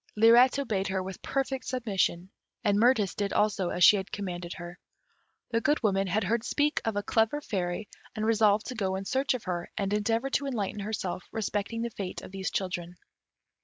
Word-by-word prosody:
Lirette 235 Hz, +4 st, +6 dB
obeyed 215 Hz, -8 st, -1 dB
her 190 Hz, -1 st, -1 dB
with 190 Hz, 0 st, -7 dB
perfect 270 Hz, -1 st, -2 dB
submission, 195 Hz, -7 st, -1 dB, 0.3 s
and 205 Hz, -2 st, +3 dB
Mirtis 225 Hz, -4 st, +3 dB
did 200 Hz, -1 st, -2 dB
also 205 Hz, -4 st, +1 dB
as 180 Hz, -, 0 dB
she 210 Hz, -, +8 dB
had 190 Hz, -2 st, -5 dB
commanded 180 Hz, -3 st, -4 dB
her. 175 Hz, 0 st, -9 dB, 0.7 s
The 230 Hz, -1 st, +1 dB
Good 295 Hz, 0 st, +1 dB
Woman 195 Hz, -2 st, +2 dB
had 200 Hz, +4 st, +1 dB
heard 220 Hz, +4 st, 0 dB
speak 295 Hz, +3 st, +1 dB
of 225 Hz, -2 st, -1 dB
a 205 Hz, -, -1 dB
clever 225 Hz, +6 st, +1 dB
fairy, 190 Hz, -5 st, -3 dB, 0.3 s
and 215 Hz, -, -1 dB
resolved 215 Hz, -1 st, +3 dB
to -, -, -3 dB
go 195 Hz, -5 st, -1 dB
in 195 Hz, +1 st, -4 dB
search 265 Hz, +4 st, +1 dB
of 245 Hz, -, -6 dB
her, 175 Hz, -2 st, -3 dB
and 200 Hz, 0 st, -1 dB
endeavour 225 Hz, +5 st, 0 dB
to 280 Hz, +1 st, 0 dB
enlighten 215 Hz, -6 st, -2 dB
herself 195 Hz, -3 st, -3 dB
respecting 220 Hz, +1 st, -2 dB
the 235 Hz, -, -3 dB
fate 195 Hz, -3 st, -6 dB
of -, -, -10 dB
these 195 Hz, 0 st, -3 dB
children. 180 Hz, -2 st, -3 dB
205 Hz, 195 wpm, -28 LUFS, 190-230 Hz, 0.7 s, she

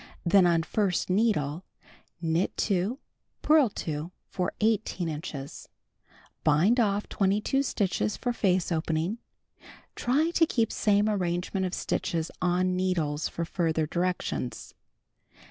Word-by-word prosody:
Then 180 Hz, +1 st, +5 dB
on 165 Hz, -1 st, +3 dB
first 190 Hz, -1 st, 0 dB
needle 185 Hz, -7 st, +1 dB, 0.6 s
knit 165 Hz, +2 st, 0 dB
2, 200 Hz, +6 st, 0 dB, 0.5 s
purl 300 Hz, -5 st, +5 dB
2 155 Hz, -3 st, -4 dB, 0.2 s
for 180 Hz, -, -1 dB
18 215 Hz, -5 st, 0 dB
stitches. 150 Hz, -3 st, -6 dB, 0.7 s
Bind 165 Hz, -, +4 dB
off 205 Hz, -2 st, +1 dB
22 210 Hz, +7 st, +1 dB
stitches 210 Hz, -5 st, -1 dB
for 245 Hz, -1 st, -1 dB
face 185 Hz, -5 st, +1 dB
opening. 165 Hz, +6 st, -1 dB, 0.8 s
(Try 295 Hz, +7 st, +1 dB
to 330 Hz, -1 st, +3 dB
keep 230 Hz, -6 st, +1 dB
same 205 Hz, 0 st, +2 dB
arrangement 185 Hz, -1 st, -1 dB
of 180 Hz, -, -4 dB
stitches 165 Hz, -1 st, -2 dB
on 180 Hz, +1 st, +1 dB
needles 165 Hz, -5 st, 0 dB
for 170 Hz, -, -3 dB
further 160 Hz, -2 st, 0 dB
directions.) 175 Hz, -6 st, -3 dB
185 Hz, 115 wpm, -28 LUFS, 165-210 Hz, 0.8 s, Then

